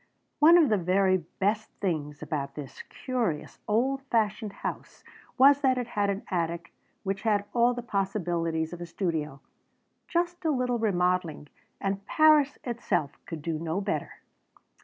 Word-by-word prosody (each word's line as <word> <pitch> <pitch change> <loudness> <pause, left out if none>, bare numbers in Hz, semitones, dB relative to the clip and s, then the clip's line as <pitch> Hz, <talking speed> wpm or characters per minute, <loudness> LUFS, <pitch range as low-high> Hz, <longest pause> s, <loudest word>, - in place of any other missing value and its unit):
One 330 +3 +8
of 320 -6 +5
the 210 -2 +2
very 185 +2 +3
best 200 +5 -2
things 150 -6 -2
about 140 -2 -4
this 145 -3 -8
curious, 235 -12 -3
old 260 +6 +1
fashioned 215 -2 0
house - - -7 0.3
was 280 +2 +6
that 260 -2 +3
it 245 -1 -3
had 205 -2 0
an 200 +1 -2
attic 170 -1 -2 0.3
which 195 0 -2
had 205 -2 +1
all 240 +1 +3
the 245 - -5
possibilities 175 -6 -1
of 175 - -8
a 175 - -5
studio. 160 -6 -3 0.7
Just 345 0 -1
a 320 - +1
little 250 -4 0
remodeling 180 -7 0 0.3
and 195 0 -2
Paris 305 -2 +5
itself 235 - -1 0.2
could 160 -3 -6
do 160 -1 -2
no 165 +3 -2
better. 205 0 -3
200 Hz, 150 wpm, -28 LUFS, 170-245 Hz, 0.7 s, One